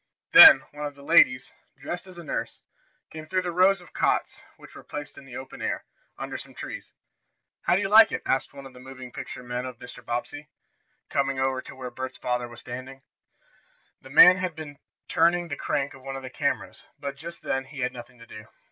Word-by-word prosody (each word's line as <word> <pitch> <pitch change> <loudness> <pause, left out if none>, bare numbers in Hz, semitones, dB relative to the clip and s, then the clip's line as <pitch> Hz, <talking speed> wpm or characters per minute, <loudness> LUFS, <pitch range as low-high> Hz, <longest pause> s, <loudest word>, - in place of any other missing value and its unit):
Then 320 -1 +11
one 150 0 -5
of 145 - -10
the 140 - -15
ladies, 125 -2 +4 0.3
dressed 175 +2 -6
as 185 -2 -13
a 170 - -9
nurse, - - -4 0.5
came 155 0 -9
through 185 +2 0
the 180 - -3
rows 185 +2 +3
of 180 - -17
cots - - 0 0.2
which - - -15
were - - -11
placed 145 0 -8
in - - -13
the 125 -2 -9
open 130 - -9
air, - - -3 0.3
under - - -6
some - - -11
trees. - - -8 0.7
"How 175 - +4
do 200 - +1
you - - 0
like 215 +2 +7
it?" - - -4
asked 130 - 0
one 140 - -11
of 135 - -12
the 125 - -14
moving 130 -1 -10
picture - - -8
men 125 0 -4
of 130 -2 -7
Mr. 125 0 -12
Bobbsey, 120 +6 -5 0.6
coming 135 -1 0
over 130 -1 0
to - - -12
where 130 -1 -7
Bert's 130 +1 -6
father 125 -1 -2
was 120 0 -13
standing. 130 +2 -9 1.0
The 135 - -14
man 180 +6 +8
had 180 -3 -3
been 145 -3 -9 0.3
turning 170 +1 +2
the 145 - -3
crank 145 -2 -2
of 135 - -14
one 135 +1 -6
of 135 - -7
the 130 - -8
cameras, - - -3 0.2
but, 140 -1 -5
just 170 +4 -10
then, 135 0 -2
he 135 0 -9
had 125 0 -1
nothing 120 0 -11
to 115 - -14
do. 110 -1 -12
135 Hz, 220 wpm, -26 LUFS, 125-160 Hz, 1.0 s, Then